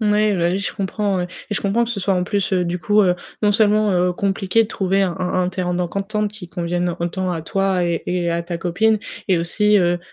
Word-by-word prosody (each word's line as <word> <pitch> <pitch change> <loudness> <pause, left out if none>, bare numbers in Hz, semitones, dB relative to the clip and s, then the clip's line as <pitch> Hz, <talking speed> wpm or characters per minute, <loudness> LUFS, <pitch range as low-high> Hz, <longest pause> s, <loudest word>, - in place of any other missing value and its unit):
N 210 -1 +2
oui, 210 0 +3
bah 170 0 +2
oui, 190 - 0
je 200 - -3
comprends. 200 -1 -1
Heu - - 0 0.3
et 210 - 0
je - - -1
comprends 215 +4 +1
que 235 - -5
ce 205 - -3
soit 195 0 +1
en 180 0 0
plus, 200 -1 -1
heu, 180 -1 +2
du 175 +1 -3
coup, 205 +6 +3
heu, 180 -2 +3 0.3
non 205 0 +4
seulement, 215 -1 +3
heu, 180 0 +2
compliqué 195 +3 +1
de - - -9
trouver 195 0 +1
un 180 -3 0
un 180 -1 -2
un - - 0
terrain 180 -1 -2
d'entente 200 +4 -2
qui 190 -5 -10
convienne 175 0 -1
autant 180 +2 -2
à 165 -2 -3
toi 195 0 0
et 170 -1 -1
et 180 -1 -1
à 170 0 0
ta 170 0 -5
copine 210 +6 +2 0.3
et 180 -3 +3
aussi, 210 +5 +3
heu 175 -1 +2
190 Hz, 255 wpm, -20 LUFS, 175-205 Hz, 0.3 s, non